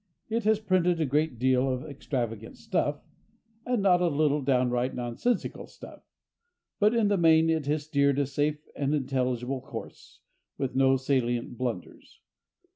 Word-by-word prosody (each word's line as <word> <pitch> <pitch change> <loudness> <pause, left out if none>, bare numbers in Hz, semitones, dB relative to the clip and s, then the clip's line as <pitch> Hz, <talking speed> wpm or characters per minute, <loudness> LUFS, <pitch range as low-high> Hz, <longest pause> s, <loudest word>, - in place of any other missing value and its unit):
It 225 0 -1
has 220 0 +4
printed 180 -4 +1
a 160 - +2
great 150 -1 0
deal 130 +2 +2
of 130 0 -2
extravagant 120 -6 -4
stuff, 175 -9 -2 0.6
and 245 -5 0
not 180 -2 +4
a 175 - +3
little 150 -1 +1
downright 125 -1 +1
nonsensical 125 - -2
stuff, - - -13 0.8
but 210 +3 +4
in 225 -3 +3
the 200 -1 +2
main 165 -1 +4
it 160 -3 -1
has 150 0 0
steered 140 -2 +1
a 145 - +2
safe 145 +2 -2
and 145 +1 0
intelligible 130 -1 -1
course, - - -10 0.4
with 135 -2 -2
no 135 0 +4
salient 125 -3 -1
blunders. 120 -7 -6
140 Hz, 150 wpm, -28 LUFS, 130-165 Hz, 0.8 s, has